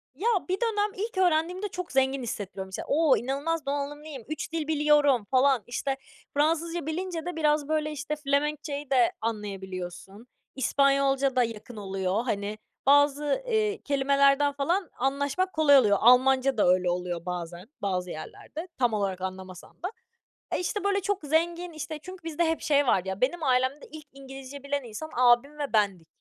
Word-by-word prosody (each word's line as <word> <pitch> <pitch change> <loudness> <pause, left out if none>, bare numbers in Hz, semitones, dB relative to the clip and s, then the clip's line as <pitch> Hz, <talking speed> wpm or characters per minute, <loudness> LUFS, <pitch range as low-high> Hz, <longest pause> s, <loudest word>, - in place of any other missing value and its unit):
Ya, 385 - -2 0.2
bir 370 - +2
dönem 420 -3 +1
ilk 430 -1 -4
öğrendiğimde 360 +2 +1
çok 365 -2 -6
zengin 265 -1 +1
hissettiriyor, 200 -4 -5
mesela. 190 0 -6
"O! 300 -1 +4
inanılmaz 285 +5 -2
donanımlıyım, 285 -1 -4
3 310 +1 -4
dil 320 -2 -2
biliyorum." 295 -6 +3
falan. 260 -3 +4
İşte, 270 +3 -2 0.4
Fransızca 330 +2 0
bilince 340 0 -3
de 355 -1 -4
biraz, 300 -2 +1
böyle, 305 -1 0
işte, 295 +1 -4
Felemenkçe'yi 290 0 -2
de 255 -3 +4
anlayabiliyorsun. 195 -1 -6 0.3
İspanyolca 275 0 +2
da 250 - +4
yakın 230 +1 -6
oluyor, 195 +1 -1
hani, 205 -2 -2 0.3
bazı, 285 - +3
eee, 435 -2 0
kelimelerden 280 0 +3
falan 335 +6 0
anlaşmak 285 +8 0
kolay 300 -3 +6
oluyor. 210 -6 +4
Almanca 260 +2 +5
da 205 - +3
öyle 180 0 +3
oluyor 175 -1 -3
bazen, 175 +2 -6
bazı 185 -2 -1
yerlerde, 305 - -8
tam 245 -3 +2
olarak 195 -3 -1
anlamasan 185 - -8
da. 365 - -2 0.6
E, - - 0
işte, 380 +3 -2
böyle, 400 0 +1
çok 405 +1 -1
zengin, 340 +4 0
işte, 310 0 -6
çünkü 370 0 -10
bizde 330 +1 0
hep 325 0 0
şey 285 -2 +2
var 190 - +4
ya 190 +1 -4
benim 315 +6 0
ailemde 260 +2 +1
ilk 310 -2 -10
İngilizce 270 0 -10
bilen 280 0 -2
insan 240 +7 -7
abim 250 +4 +4
ve 285 -4 -3
bendik. 195 -6 +1
280 Hz, 160 wpm, -27 LUFS, 230-315 Hz, 0.6 s, kolay